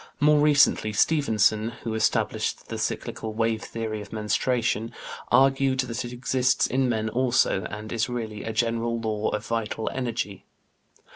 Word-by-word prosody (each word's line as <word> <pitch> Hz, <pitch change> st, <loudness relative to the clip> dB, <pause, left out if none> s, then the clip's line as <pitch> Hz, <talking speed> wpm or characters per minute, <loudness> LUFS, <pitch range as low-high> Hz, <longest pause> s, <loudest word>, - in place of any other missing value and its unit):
More 150 Hz, 0 st, +5 dB
recently 145 Hz, -7 st, +4 dB
Stephenson, 110 Hz, -4 st, +2 dB
who 115 Hz, -, -3 dB
established 110 Hz, -, 0 dB
the -, -, -4 dB
cyclical 110 Hz, -1 st, -3 dB
wave 115 Hz, 0 st, 0 dB
theory 110 Hz, -2 st, -4 dB
of 105 Hz, -, -11 dB
menstruation, 115 Hz, +1 st, 0 dB, 0.4 s
argued 135 Hz, 0 st, +4 dB
that 125 Hz, -1 st, -4 dB
it 120 Hz, -, -6 dB
exists 125 Hz, +1 st, +1 dB
in 130 Hz, 0 st, +1 dB
men 110 Hz, -2 st, 0 dB
also, 120 Hz, -5 st, +1 dB
and 105 Hz, +1 st, -7 dB
is 115 Hz, +1 st, 0 dB
really 110 Hz, -4 st, -4 dB
"a 110 Hz, -, -3 dB
general 115 Hz, +1 st, 0 dB
law 110 Hz, -2 st, -1 dB
of 105 Hz, 0 st, -3 dB
vital 115 Hz, -1 st, -2 dB
energy." 115 Hz, -6 st, -3 dB
115 Hz, 145 wpm, -25 LUFS, 110-125 Hz, 0.4 s, More